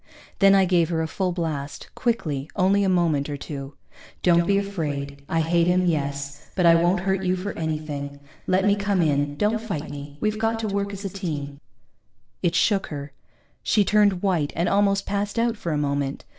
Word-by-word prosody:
Then 195 0 +6
I 195 -1 +5
gave 175 -3 +2
her 165 -2 0
a - - -2
full 185 +2 -1
blast, 155 -5 -4
quickly, 155 - -1
only 200 +2 +3
a 195 - +2
moment 165 -6 +1
or 145 - -3
two. 140 -1 -7 0.5
_Don't 170 -1 +4
be 200 - +3
afraid 145 -8 -3
I 165 - +1
hate 170 +1 +2
him, 180 +1 +3
yes, 140 -3 -2
but 180 - +2
I 170 - +8
won't 175 +2 +3
hurt 190 0 0
you 185 0 +1
for 190 +2 -4
anything. 150 -3 -4 0.3
Let 185 +1 +2
me 205 0 +4
come 200 -3 +1
in, 145 -1 +1
don't 215 +4 +1
fight 160 -10 -4
me. 145 0 -8
We've 215 0 -1
got 225 0 +1
to 220 - -2
work 200 0 -1
as 200 0 -7
a - - -1
team._ 150 -7 -5 0.8
It 175 -1 +1
shook 200 0 +2
her. 145 -2 -6 0.5
She 205 -2 +2
turned 205 -3 +3
white 175 -7 +1
and 170 +2 0
almost 200 0 +2
passed 205 +2 -2
out 230 0 +2
for 175 -5 -4
a 150 - 0
moment. 140 -1 -2
175 Hz, 200 wpm, -24 LUFS, 145-200 Hz, 0.8 s, I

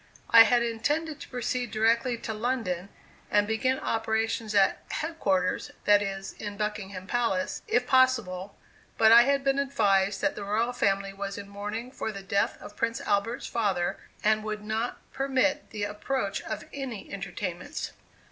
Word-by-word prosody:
I 230 0 +10
had 240 -1 +3
intended 295 +7 -1
to - - -10
proceed 250 0 -2
directly 230 +3 +2
to 220 - -5
London 215 -6 -2 0.4
and 205 0 +3
begin 220 +5 +1
operations 225 -1 -1
at 195 -1 +4
"head 320 +1 -4
quarters," 185 -2 +1 0.2
that 205 0 +6
is, 195 -1 -4
in 205 -2 -7
Buckingham 200 -3 -4
Palace, 210 -4 0
if 245 0 +2
possible; 235 -8 +2 0.4
but 220 0 +6
I 235 +1 +10
had 275 +2 +2
been 275 0 +2
advised 200 -8 +2
that - - +2
the 205 - -6
royal 220 +5 0
family 195 -4 0
was 200 0 -5
in 200 - -7
mourning 210 +5 -5
for 220 - -4
the 195 -2 -8
death 200 +1 0
of 205 - -11
Prince 230 0 -1
Albert's 210 +4 0
father, 195 -6 0 0.2
and 215 0 +3
would 215 -1 -4
not 220 +3 -2 0.2
permit 275 +2 +1
the 210 -3 -4
approach 210 +1 -2
of - - -5
any 260 -9 -6
entertainments. 185 -2 -5
220 Hz, 160 wpm, -28 LUFS, 200-245 Hz, 0.4 s, I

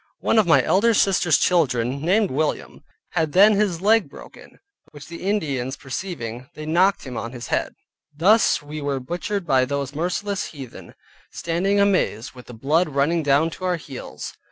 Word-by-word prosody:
One 225 - +2
of 210 - +2
my 165 - +5
elder 230 +4 +3
sisters' 180 -6 +3
children, 135 -6 +1
named 195 +6 +2
William, 150 +3 -3 0.3
had 160 -2 -1
then 205 +4 +7
his 200 -5 0
leg 210 -5 +3
broken, - - -14 0.3
which 145 -1 -12
the 170 0 -9
Indians 145 -10 -2
perceiving, 130 -6 -6
they 155 - -7
knocked 180 +5 +2
him 125 -3 -7
on 115 - -5
[his] 120 -2 -8
head. - - -1 0.4
Thus 185 +5 +3
were 145 -1 -4
we - - -3
butchered 175 +8 -4
by 135 -4 +3
those 140 0 -3
merciless 180 +5 -2
heathen, 135 -6 -11 0.4
standing 185 +5 -1
amazed, 185 - +1
with 125 -1 -14
the 125 - -10
blood 155 +9 +1
running 150 +4 +1
down 145 +3 +2
to 185 - -7
our 180 -1 +1
heels. 140 -5 -8
160 Hz, 170 wpm, -22 LUFS, 140-190 Hz, 0.4 s, then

